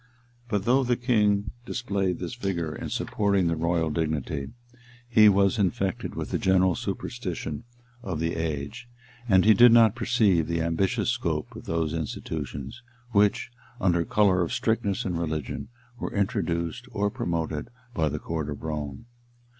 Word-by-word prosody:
] 120 0 -31
But 105 -3 -1
though 130 +3 +4
the 120 -1 +1
king 105 -5 +2
displayed 100 -7 -1
this - - -5
vigor 90 -9 -3
in - - -5
supporting 100 -3 +1
the 85 -1 +1
royal 80 0 0
dignity, 75 -2 -2 0.6
he 110 -3 +7
was 100 +1 +3
infected 95 -1 -1
with - - -4
the - - 0
general 95 -1 +3
superstition 75 +1 -4 0.4
of 90 -9 -4
the 85 +1 -1
age; 80 - -4 0.4
and 95 -1 +5
he 110 - +8
did 120 +4 +7
not 115 -3 +6
perceive 105 -9 +2
the 85 -1 0
ambitious 95 +8 +1
scope 85 -12 -2
of - - -9
those 80 -1 -1
institutions, 80 - -5 0.3
which 105 +2 +2 0.3
under 85 -5 +2
color 95 -1 +3
of 85 - -1
strictness 115 -2 0
in 90 -3 -1
religion, 80 -5 -3 0.3
were - - -4
introduced 95 +2 -1
or 105 0 0
promoted 80 -5 -3 0.2
by 80 -2 +1
the - - -3
court 80 -2 -4
of 75 +1 -6
Rome. 75 - -4
95 Hz, 155 wpm, -26 LUFS, 80-110 Hz, 0.6 s, he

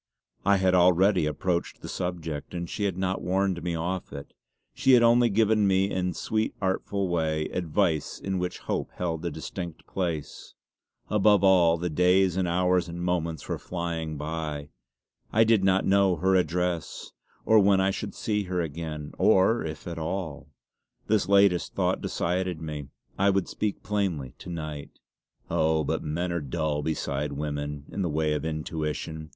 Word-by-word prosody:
I 100 0 +4
had 95 -1 +2
already 90 -1 +4
approached 85 +3 -2
the - - -7
subject, 85 -3 -4
and 85 0 -3
she 105 +4 -3
had 95 -3 -1
not 95 0 -1
warned 95 0 0
me 85 -1 -2
off 90 +3 -3
it; 70 0 -9 0.4
she 135 - +3
had 120 -1 +7
only 120 0 +5
given 110 0 +3
me 95 +1 +2
in 90 -1 0
a - - -4
sweetly 110 0 -1
artful 95 0 -1
way 80 -3 0
advice 85 -2 0
in 95 -1 -2
which 90 0 -3
hope - - -2
held 80 -2 -3
a 85 - -1
distinct 85 +1 -7
place. 85 -6 -4 0.6
Above 105 -1 +4
all, 90 -3 +5
the 90 +1 -2
days 90 +3 +3
and 95 -1 0
hours 90 0 +2
and 85 +1 -5
moments 85 -2 -2
were - - -3
flying 85 -3 -4
by. 75 -1 -4 0.6
I 110 - +5
did 110 -3 +3
not 95 0 +3
know 95 -1 +4
her 95 +4 +1
address 90 -1 -1 0.3
or 110 0 +6
when 100 -1 +4
I 95 +1 +2
should - - -5
see 105 -2 -1
her 90 0 -2
again, 75 -2 -4
or 105 +5 +4
if 80 -1 -6
at 85 -2 -5
all. 80 -3 -4 0.6
This 105 -2 +1
latest 100 -3 +4
thought - - 0
decided 90 -1 -1
me. 75 -3 -6 0.3
I 100 +1 +4
would 95 -2 +1
speak 105 -2 -3
plainly 95 -11 -2
to - - -9
night. 75 -4 -6 0.5
Oh, 80 0 +2
but - - -1
men 85 +4 -2
are 85 -1 -1
dull 75 +1 -2
beside 75 -2 -2
women 75 0 -4
in 100 - -3
the 90 - 0
way 75 0 0
of 75 - -2
intuition. 80 0 -4
90 Hz, 170 wpm, -27 LUFS, 80-95 Hz, 0.6 s, had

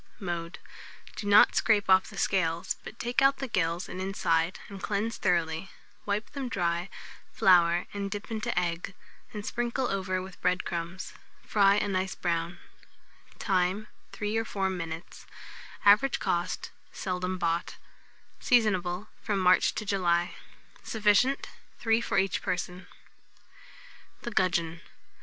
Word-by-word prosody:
Mode. 170 -3 -4 0.6
Do 205 - -5
not 205 +1 +7
scrape 210 -3 +3
off 190 0 +5
the 200 - -11
scales, 170 -4 0
but - - -9
take 240 +2 0
out 275 0 +5
the 270 - -4
gills 170 -4 -1
and 185 - -6
inside, 170 -3 0
and 195 -1 -9
cleanse 215 +2 -1
thoroughly; 170 +1 0 0.4
wipe 205 +2 -1
them 275 -3 -4
dry, 175 -2 -1 0.4
flour 175 -2 +4
and 200 -1 -3
dip 205 +1 -5
them 225 - -4
into 215 - -3
egg, 175 +2 -3 0.4
and 210 -1 -6
sprinkle 240 +2 -1
over 185 -1 -1
with 185 0 -9
bread 180 +1 +1
crumbs. 175 +1 -5 0.3
Fry 200 -1 +4
of - - +1
a - - -1
nice 190 -1 -1
brown. 170 0 -2 0.8
Time. 190 +3 0 0.2
3 210 +1 -3
or 225 - +1
4 195 -3 -1
minutes. 165 -2 -6 0.6
Average 210 +6 +6
cost. 175 +1 -2 0.2
Seldom 185 0 -3
bought. 170 -1 -1 0.6
Seasonable 200 -5 +2
from 205 - -1
March 185 -1 +4
to 215 - -3
July. 175 -3 +1 0.5
Sufficient, 220 +5 +2 0.3
3 225 0 +2
for 210 -3 -1
each 195 -1 +1
person. 180 0 -3 0.2
[Illustration: - - -24
THE 235 - -4
GUDGEON. 170 -4 0
190 Hz, 140 wpm, -29 LUFS, 175-210 Hz, 0.8 s, not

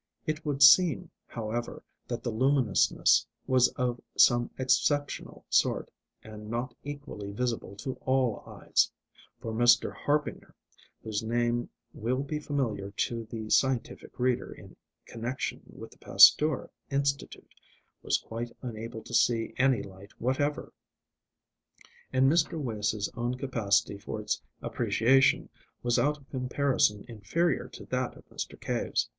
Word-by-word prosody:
It 155 +1 -3
would 140 -2 +1
seem, 175 +3 +6 0.2
however, 115 +1 -5 0.2
that 120 -1 -4
the 120 - -2
luminousness 130 -2 +3 0.2
was 130 -1 +4
of 125 -1 -1 0.2
some 120 0 +5
exceptional 145 +2 0
sort, - - +1 0.3
and 105 -1 -10
not 120 +2 -3
equally 145 -8 -7
visible 115 -2 -3
to 130 +6 -6
all 130 -5 +1
eyes; - - +1 0.5
for 110 - -5
Mr. 120 +1 +4
Harbinger 150 0 -2 0.5
whose 110 -1 -2
name 120 +1 0 0.2
will 125 +5 -1
be 150 +2 -3
familiar 120 -10 -2
to 115 +3 -2
the 110 -1 -7
scientific 130 -3 0
reader 125 0 0
in - - -13 0.3
connection 120 +3 -4
with - - -11
the - - -20
Pasteur 150 -2 +5 0.2
Institute 140 0 -2 0.5
was - - +1
quite 115 +1 -6
unable 115 -1 -6
to - - -11
see 115 -1 +2
any 130 -4 +3
light 95 +1 -14
whatever. 140 +4 -1 1.4
And 130 0 +3
Mr. 160 +2 +2
Wace's 110 -5 -1
own 120 +1 -2
capacity 110 -6 0
for - - -6
its - - -2 0.2
appreciation 135 +4 +2 0.3
was 120 -1 +2
out 150 +1 +1
of 140 -2 -21
comparison 125 -5 +1
inferior 120 - -1
to - - -11
that 125 -1 -2
of - - -17
Mr. - - -6
Cave's. - - -1
125 Hz, 130 wpm, -29 LUFS, 115-135 Hz, 1.4 s, seem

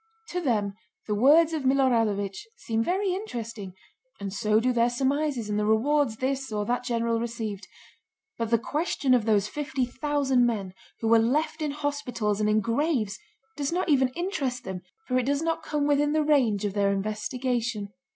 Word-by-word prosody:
To 360 - -2
them 210 - 0 0.3
the 210 - -1
words 300 +9 +5
of 315 - -1
Milorádovich 230 -7 +2 0.2
seem 225 0 -1
very 375 - 0
interesting, 230 - -6 0.4
and 195 -1 -5
so 215 0 +2
do 250 +2 +1
their 235 0 +3
surmises 270 -1 0
and 210 0 -1
the 210 - 0
rewards 250 +3 +2
this 265 0 -2
or 210 -1 -1
that 245 +3 -1
general 230 -2 0
received; 225 -4 -4 0.7
but 230 -1 -3
the 230 - +4
question 280 +1 0
of 240 -4 +3
those 210 -2 +2
fifty 275 -1 -2
thousand 270 -1 +1
men 200 -5 -3 0.3
who 225 - 0
were 230 0 +6
left 305 +7 0
in 305 - 0
hospitals 280 -8 -2
and 210 - +2
in 215 0 +3
graves 230 -4 0 0.4
does 280 0 -2
not 355 0 -1
even 265 -3 +4
interest 295 -9 -2
them, 190 -1 -5 0.3
for 255 -1 +2
it 255 - -2
does 285 +2 +1
not 330 0 -1
come 300 -2 -1
within 290 0 +2
the 310 0 +2
range 250 -9 +2
of 200 - -2
their 200 -1 +2
investigation. 215 +1 -2
245 Hz, 180 wpm, -27 LUFS, 215-290 Hz, 0.7 s, were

